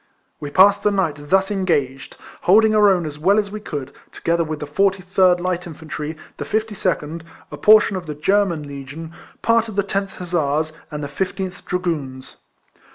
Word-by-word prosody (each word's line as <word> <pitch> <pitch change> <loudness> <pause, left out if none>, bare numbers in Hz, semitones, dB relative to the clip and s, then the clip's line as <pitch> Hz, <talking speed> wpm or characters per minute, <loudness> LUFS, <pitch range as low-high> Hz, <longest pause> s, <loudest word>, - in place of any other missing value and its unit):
We 145 - -5
passed 195 +6 +5
the 210 - +3
night 155 -8 -2
thus 195 +1 +3
engaged, 145 -10 -1 0.2
hold 210 +5 +5
ing 215 - +2
our 210 -1 +6
own 180 -4 +2
as 150 -1 -7
well 195 +6 +3
as 205 -2 0
we 215 - -5
could, 145 -8 -6 0.2
together 170 0 0
with 155 -1 -5
the - - -4
43rd 185 +2 +2
Light 180 0 -2
Infantry, 160 -1 -6 0.2
the - - -4
52nd, 210 -7 -2 0.3
a 150 - -7
portion 210 +4 +5
of 180 -3 -5
the 150 - -5
German 185 0 +1
Legion, 140 +4 -8 0.3
part 230 0 +3
of 215 - -8
the 200 - +2
10th 195 0 -2
Hussars, 155 -3 -1 0.2
and 150 -1 -5
the - - -3
15th 190 +5 -4
Dragoons. 155 -8 -4
175 Hz, 175 wpm, -21 LUFS, 150-195 Hz, 0.3 s, our